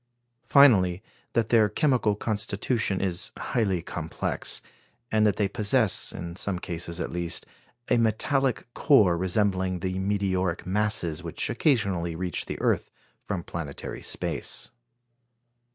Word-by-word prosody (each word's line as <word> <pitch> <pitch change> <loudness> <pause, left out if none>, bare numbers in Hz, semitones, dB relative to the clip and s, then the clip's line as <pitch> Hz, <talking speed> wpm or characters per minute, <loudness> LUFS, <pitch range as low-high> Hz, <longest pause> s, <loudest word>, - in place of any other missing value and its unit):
Finally, 105 -10 +5 0.3
that 115 -2 +1
their 110 -3 +4
chemical 125 - +2
constitution 105 -1 -1
is 90 -3 0
highly 95 -8 -1
complex, - - -2 0.5
and 110 0 +4
that 105 - +2
they 105 - +1
possess, 105 0 +2
in 85 -1 -7
some 95 0 -2
cases 85 -1 -4
at - - -3
least, 85 -1 -2 0.4
a - - +3
metallic 120 +4 +1
core 105 - +4
resembling 95 0 0
the 95 0 -2
meteoric 95 -3 -1
masses 90 -4 0
which 85 -2 -2
occasionally 95 - +1
reach 90 0 -2
the - - -5
earth - - +1 0.4
from 95 -4 -2
planetary 75 -5 -6
space. - - -3
100 Hz, 120 wpm, -26 LUFS, 90-110 Hz, 0.5 s, Finally